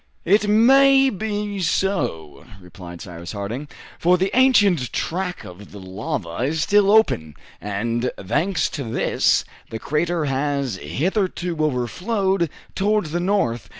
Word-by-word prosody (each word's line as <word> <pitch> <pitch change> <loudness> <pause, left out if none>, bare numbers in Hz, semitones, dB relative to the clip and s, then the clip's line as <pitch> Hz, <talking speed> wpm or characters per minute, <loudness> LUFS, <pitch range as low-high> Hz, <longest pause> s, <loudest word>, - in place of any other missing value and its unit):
"It 205 +2 +3
may 270 +5 +5
be 205 0 -3
so," 125 - -2 0.2
replied 90 -1 -11
Cyrus 85 0 -8
Harding, 110 +8 -5 0.3
"for 180 +2 +3
the 190 +2 -1
ancient 205 - +4
track 180 +1 -3
of 90 +3 -12
the 105 - -10
lava 95 - -5
is 155 +4 0
still 205 -1 +3
open; 85 - +3 0.3
and 115 +4 -2
thanks 160 - 0
to 145 - -5
this, 115 - +1 0.2
the 115 - -5
crater 160 +5 -1
has 140 -4 -1
hitherto 175 - -2
overflowed 170 - 0 0.2
towards 205 -4 0
the 175 - -1
north. 145 - -1
155 Hz, 125 wpm, -21 LUFS, -, 0.3 s, may